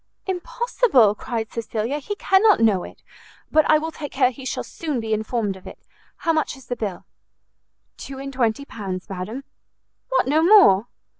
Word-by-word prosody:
"Impossible!" 380 Hz, -, +2 dB
cried 225 Hz, +1 st, -4 dB
Cecilia, 230 Hz, +4 st, -3 dB
"he 410 Hz, +8 st, -5 dB
cannot 395 Hz, +1 st, +4 dB
know 215 Hz, -5 st, +3 dB
it; -, -, -12 dB, 0.5 s
but 310 Hz, 0 st, +3 dB
I 310 Hz, -, +7 dB
will 320 Hz, +1 st, -4 dB
take 295 Hz, -3 st, -7 dB
care 260 Hz, -2 st, +2 dB
he 260 Hz, +1 st, -11 dB
shall -, -, -3 dB
soon 300 Hz, -6 st, -4 dB
be 220 Hz, -1 st, -2 dB
informed 215 Hz, -2 st, -1 dB
of 190 Hz, -, -13 dB
it. -, -, -12 dB, 0.4 s
How 330 Hz, -, +3 dB
much 310 Hz, -3 st, -1 dB
is 265 Hz, -, -16 dB
the 245 Hz, -, -3 dB
bill?" 205 Hz, -6 st, -5 dB, 0.9 s
"Two 270 Hz, -, -8 dB
and 275 Hz, 0 st, -7 dB
twenty 250 Hz, +1 st, 0 dB
pounds, 190 Hz, -7 st, -6 dB
madam." 200 Hz, +8 st, -5 dB, 0.7 s
"What, -, -, +2 dB
no 305 Hz, +3 st, +3 dB
more?" 330 Hz, -, +6 dB
260 Hz, 170 wpm, -22 LUFS, 220-315 Hz, 0.9 s, I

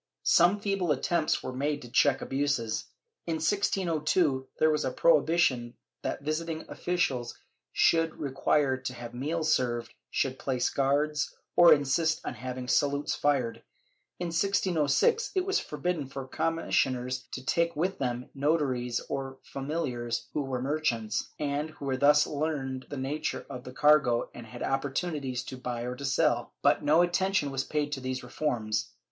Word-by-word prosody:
Some 175 Hz, +4 st, +5 dB
feeble 195 Hz, -5 st, 0 dB
attempts 155 Hz, +3 st, +1 dB
were 130 Hz, -, -4 dB
made 145 Hz, +2 st, -1 dB
to 120 Hz, -, -11 dB
check 135 Hz, 0 st, +3 dB
abuses. 135 Hz, -5 st, -1 dB, 0.4 s
In 165 Hz, -, 0 dB
1602 160 Hz, -5 st, +1 dB
there 155 Hz, -, +4 dB
was 150 Hz, -, 0 dB
a 130 Hz, -, 0 dB
prohibition 145 Hz, -5 st, +3 dB, 0.3 s
that -, -, -3 dB
visiting 160 Hz, +2 st, -2 dB
officials 135 Hz, -9 st, -1 dB, 0.3 s
should 165 Hz, -1 st, +3 dB
require 135 Hz, 0 st, +1 dB
to 130 Hz, -1 st, -5 dB
have 120 Hz, -1 st, -8 dB
meals 155 Hz, +6 st, 0 dB
served, 120 Hz, -2 st, -1 dB, 0.2 s
should 130 Hz, -1 st, -1 dB
place 130 Hz, -2 st, 0 dB
guards, 145 Hz, +2 st, +1 dB, 0.2 s
or 175 Hz, -1 st, +8 dB
insist 160 Hz, +3 st, +3 dB
on -, -, -3 dB
having 125 Hz, +1 st, -6 dB
salutes 140 Hz, +2 st, +1 dB
fired; 135 Hz, -5 st, +1 dB, 0.6 s
in 175 Hz, -1 st, -2 dB
1606 190 Hz, -, +2 dB
it 370 Hz, -1 st, +1 dB
was 390 Hz, 0 st, +2 dB
forbidden 155 Hz, -2 st, -3 dB
for 135 Hz, 0 st, -7 dB
commissioners 130 Hz, -5 st, 0 dB
to 130 Hz, -, -6 dB
take 170 Hz, +3 st, +1 dB
with 185 Hz, +5 st, -1 dB
them 125 Hz, -1 st, -3 dB
notaries 135 Hz, -5 st, 0 dB
or 135 Hz, -1 st, -4 dB
familiars 135 Hz, -5 st, -3 dB
who 150 Hz, -, 0 dB
were 130 Hz, -2 st, -3 dB
merchants, 120 Hz, -7 st, -1 dB
and 145 Hz, +1 st, -2 dB
who 140 Hz, -3 st, -3 dB
thus 145 Hz, +2 st, +5 dB
learned 140 Hz, -4 st, -3 dB
the 145 Hz, -, -5 dB
nature 135 Hz, +4 st, -3 dB
of 125 Hz, -, -7 dB
the 125 Hz, -, -7 dB
cargo 140 Hz, -4 st, +3 dB
and 120 Hz, -1 st, -10 dB
had 120 Hz, +2 st, -7 dB
opportunities 135 Hz, -1 st, -2 dB
to 130 Hz, -, -7 dB
buy 125 Hz, -2 st, -4 dB
or 125 Hz, +1 st, -3 dB
to 140 Hz, -, -6 dB
sell; 135 Hz, -, +1 dB
but -, -, +4 dB
no 155 Hz, +4 st, +5 dB
attention 175 Hz, -4 st, +1 dB
was 135 Hz, 0 st, -1 dB
paid 150 Hz, 0 st, -2 dB
to 135 Hz, -3 st, -3 dB
these 130 Hz, 0 st, -3 dB
reforms. 115 Hz, -5 st, -2 dB
140 Hz, 155 wpm, -29 LUFS, 130-160 Hz, 0.6 s, or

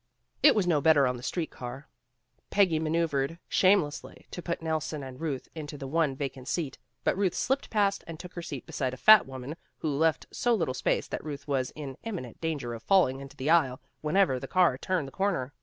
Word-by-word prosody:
It 290 Hz, -, +7 dB
was 205 Hz, -4 st, +2 dB
no 160 Hz, -5 st, +2 dB
better 145 Hz, -2 st, +5 dB
on 125 Hz, -1 st, 0 dB
the -, -, -10 dB
street 165 Hz, +5 st, -3 dB
car. 125 Hz, +3 st, -8 dB, 0.6 s
Peggy 185 Hz, -6 st, +3 dB
maneuvered 160 Hz, -2 st, 0 dB
shamelessly 185 Hz, -6 st, +1 dB
to 175 Hz, -, -6 dB
put 170 Hz, 0 st, -3 dB
Nelson 155 Hz, -2 st, -2 dB
and 130 Hz, +1 st, -9 dB
Ruth 145 Hz, -5 st, -3 dB
into 150 Hz, -2 st, -7 dB
the 135 Hz, -, -6 dB
one 150 Hz, 0 st, +1 dB
vacant 135 Hz, -2 st, -5 dB
seat, 155 Hz, -6 st, -2 dB, 0.2 s
but -, -, +2 dB
Ruth 190 Hz, -2 st, +1 dB
slipped 270 Hz, +2 st, 0 dB
past 200 Hz, -2 st, +1 dB
and 165 Hz, -1 st, -7 dB
took 180 Hz, -1 st, -9 dB
her 175 Hz, -, -5 dB
seat 145 Hz, -6 st, -6 dB
beside 130 Hz, -2 st, -2 dB
a -, -, -14 dB
fat 215 Hz, +4 st, +7 dB
woman, 130 Hz, +3 st, -6 dB, 0.2 s
who 150 Hz, -3 st, -2 dB
left 160 Hz, +2 st, +2 dB
so 240 Hz, -1 st, +2 dB
little 165 Hz, -11 st, -1 dB
space 130 Hz, -, 0 dB
that -, -, -4 dB
Ruth 145 Hz, -1 st, -7 dB
was 135 Hz, -3 st, 0 dB
in 140 Hz, -4 st, -7 dB
imminent 175 Hz, -, -6 dB
danger 150 Hz, -7 st, -2 dB
of 115 Hz, -, -7 dB
falling 155 Hz, -, +3 dB
into 135 Hz, -1 st, -11 dB
the 140 Hz, +4 st, 0 dB
aisle, 135 Hz, -7 st, +3 dB, 0.2 s
whenever 155 Hz, -4 st, +2 dB
the -, -, -7 dB
car 180 Hz, -7 st, +4 dB
turned 165 Hz, +2 st, -1 dB
the -, -, -9 dB
corner. 175 Hz, -9 st, -1 dB
155 Hz, 210 wpm, -29 LUFS, 135-175 Hz, 0.6 s, It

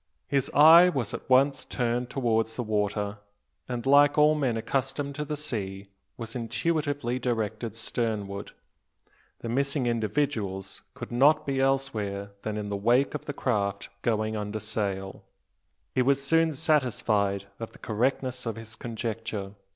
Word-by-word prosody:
His 140 Hz, -1 st, +1 dB
eye 165 Hz, +4 st, +9 dB
was 130 Hz, -, -2 dB
at -, -, -7 dB
once 135 Hz, +1 st, +4 dB
turned 120 Hz, 0 st, -1 dB
towards 115 Hz, -4 st, 0 dB
the 125 Hz, -, -2 dB
water; 105 Hz, -1 st, -1 dB, 0.5 s
and, 125 Hz, -1 st, -3 dB
like 145 Hz, +2 st, +5 dB
all 150 Hz, +1 st, +6 dB
men 135 Hz, -7 st, 0 dB
accustomed 135 Hz, +4 st, -2 dB
to 150 Hz, +1 st, -4 dB
the 150 Hz, +1 st, -3 dB
sea, 100 Hz, -9 st, -5 dB, 0.3 s
was 115 Hz, 0 st, -7 dB
intuitively 145 Hz, 0 st, -1 dB
directed 115 Hz, -2 st, -2 dB
sternward. 110 Hz, -4 st, -3 dB, 0.9 s
The 115 Hz, -, -5 dB
missing 140 Hz, +2 st, 0 dB
individuals 110 Hz, -5 st, -1 dB
could -, -, -8 dB
not 150 Hz, +5 st, +4 dB
be 135 Hz, -1 st, 0 dB
elsewhere 105 Hz, -7 st, -1 dB
than 110 Hz, -1 st, -3 dB
in 105 Hz, -1 st, -4 dB
the 100 Hz, -, -2 dB
wake 120 Hz, +7 st, +2 dB
of -, -, -5 dB
the 145 Hz, -, -3 dB
craft 100 Hz, -7 st, -1 dB
going 110 Hz, -1 st, 0 dB
under 105 Hz, 0 st, -3 dB
sail. 100 Hz, -2 st, -3 dB, 0.7 s
He 130 Hz, -, +2 dB
was 135 Hz, +2 st, +3 dB
soon 165 Hz, +3 st, +3 dB
satisfied 110 Hz, -10 st, +1 dB
of 115 Hz, -, -6 dB
the -, -, -16 dB
correctness 125 Hz, +2 st, -1 dB
of 115 Hz, -, -2 dB
his 115 Hz, 0 st, -8 dB
conjecture. 115 Hz, -3 st, -4 dB
120 Hz, 145 wpm, -27 LUFS, 105-135 Hz, 0.9 s, eye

